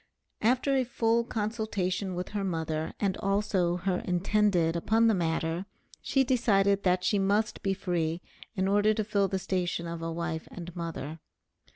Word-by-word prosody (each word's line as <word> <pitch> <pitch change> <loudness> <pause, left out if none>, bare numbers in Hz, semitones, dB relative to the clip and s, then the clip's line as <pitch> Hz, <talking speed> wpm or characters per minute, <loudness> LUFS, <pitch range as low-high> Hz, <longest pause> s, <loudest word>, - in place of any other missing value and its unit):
After 255 +4 +2
a 260 - +3
full 235 -1 +1
consultation 205 -4 -2
with 180 +1 -4
her 205 -1 -2
mother 160 -3 -2
and 195 -2 +1
also 195 -3 +1
her 180 0 -1
intended 180 -2 +2
upon 220 +7 +2
the 225 - +5
matter, 165 0 -1 0.3
she 270 - +2
decided 200 -6 +3
that 180 -1 +2
she 205 - +2
must 210 +3 +1
be 195 -1 0
free 170 -4 -1 0.4
in 190 -1 +1
order 205 +2 +3
to 215 - 0
fill 200 -1 +1
the 190 - -1
station 180 -2 -2
of 170 0 -5
a 165 0 -3
wife 165 -1 -3
and 175 -1 -8
mother. 165 -2 -5
195 Hz, 165 wpm, -29 LUFS, 170-210 Hz, 0.4 s, the